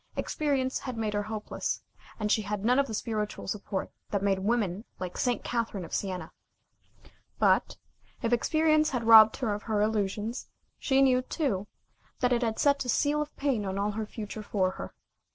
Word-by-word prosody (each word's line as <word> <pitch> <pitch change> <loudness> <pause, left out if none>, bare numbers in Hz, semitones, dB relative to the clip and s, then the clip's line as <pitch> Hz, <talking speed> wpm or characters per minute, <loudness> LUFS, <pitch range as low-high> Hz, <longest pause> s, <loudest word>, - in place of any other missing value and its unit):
Experience 270 -4 -1
had 255 -3 -6
made 215 -2 -1
her 205 - +1
hopeless, 215 0 -4 0.4
and 210 -1 0
she 220 - +3
had 205 0 -3
none 250 +3 +4
of 280 - +2
the 220 - -6
spiritual 210 -2 -3
support 195 -1 -3 0.2
that 200 -1 -1
made 195 -1 +2
women 205 -2 0
like 180 -1 -5
St. 245 -2 0
Catherine 230 -6 -2
of - - -12
Sienna. 180 -5 -3 1.1
But, - - +2 0.5
if 230 +1 +1
experience 310 +4 +3
had 250 -3 -2
robbed 220 -1 +8
her 230 -6 -1
of 205 - -4
her 215 -1 +1
illusions, 210 +2 -1 0.3
she 270 0 +3
knew, 255 -1 +4
too, 250 - -2 0.5
that 250 0 +2
it 240 - +1
had 225 -2 -1
set 280 -1 +3
a 250 - -6
seal 295 +5 +2
of 300 0 -6
pain 270 -7 0
on 190 -1 -3
all 205 +1 0
the 215 +1 -4
future 215 0 -6
for 190 -3 0
her. - - -8
220 Hz, 185 wpm, -29 LUFS, 205-255 Hz, 1.1 s, robbed